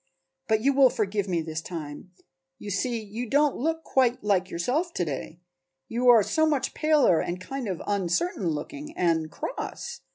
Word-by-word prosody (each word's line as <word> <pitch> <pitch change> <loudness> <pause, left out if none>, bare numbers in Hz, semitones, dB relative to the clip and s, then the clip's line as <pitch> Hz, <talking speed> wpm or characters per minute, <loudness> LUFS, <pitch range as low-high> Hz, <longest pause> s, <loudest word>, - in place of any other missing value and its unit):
But 220 -1 +2
you 275 +4 +3
will 270 -1 +6
forgive 205 -3 -1
me 175 -3 0
this 160 0 -4
time. 160 -1 -7 0.5
You 210 -3 -7
see 235 +4 -1
you 220 +3 -6
don't 290 +2 +3
look 320 +4 -1
quite 250 -3 +1
like 195 -3 +1
yourself 285 - -1
to 175 - 0
day; 160 +3 -6 0.5
you 245 +2 +2
are 230 -3 +8
so 315 +9 +2
much 290 -4 0
paler 300 - +4
and 175 +1 -3
kind 255 +6 -5
of 185 -4 -4
uncertain 195 - 0
looking 290 - -6
and 165 -3 +1
cross. - - -6
215 Hz, 170 wpm, -26 LUFS, 175-275 Hz, 0.5 s, are